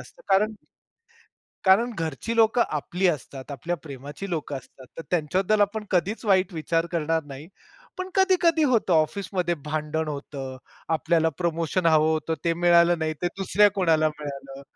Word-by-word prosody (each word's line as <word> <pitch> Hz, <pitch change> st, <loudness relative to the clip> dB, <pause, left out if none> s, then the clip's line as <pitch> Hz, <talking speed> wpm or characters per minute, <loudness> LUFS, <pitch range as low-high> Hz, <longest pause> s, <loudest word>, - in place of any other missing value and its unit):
असतं -, -, -15 dB
कारण 210 Hz, +3 st, +3 dB, 1.1 s
कारण 225 Hz, +6 st, +4 dB
घरची 165 Hz, +9 st, -3 dB
लोकं 230 Hz, +1 st, +4 dB
आपली 175 Hz, +5 st, -1 dB
असतात, 140 Hz, -4 st, -4 dB
आपल्या 165 Hz, +6 st, -3 dB
प्रेमाची 145 Hz, +6 st, -8 dB
लोक 155 Hz, -4 st, -3 dB
असतात, 130 Hz, 0 st, -9 dB
तर -, -, -4 dB
त्यांच्याबद्दल 185 Hz, +6 st, +1 dB
आपण 210 Hz, +1 st, 0 dB
कधीच 190 Hz, +4 st, 0 dB
वाईट 190 Hz, -2 st, +2 dB
विचार 165 Hz, +1 st, 0 dB
करणार 165 Hz, -1 st, 0 dB
नाही. 145 Hz, +2 st, -10 dB, 0.5 s
पण 370 Hz, 0 st, -4 dB
कधी-कधी 355 Hz, -4 st, +3 dB
होतं 230 Hz, -9 st, +2 dB
ऑफिसमध्ये 175 Hz, +2 st, 0 dB
भांडण 155 Hz, +1 st, -2 dB
होतं. 140 Hz, -2 st, -6 dB, 0.4 s
आपल्याला 165 Hz, 0 st, +2 dB
प्रमोशन 170 Hz, +1 st, -1 dB
हवं 155 Hz, -1 st, +4 dB
होतं, 160 Hz, +1 st, -1 dB
ते 170 Hz, -, +3 dB
मिळालं 170 Hz, 0 st, +4 dB
नाही 155 Hz, 0 st, -1 dB
ते 175 Hz, -, +1 dB
दुसऱ्या 200 Hz, +2 st, +4 dB
कोणाला 165 Hz, -6 st, +2 dB
मिळालं. 140 Hz, -2 st, -8 dB
170 Hz, 145 wpm, -25 LUFS, 155-195 Hz, 1.1 s, कारण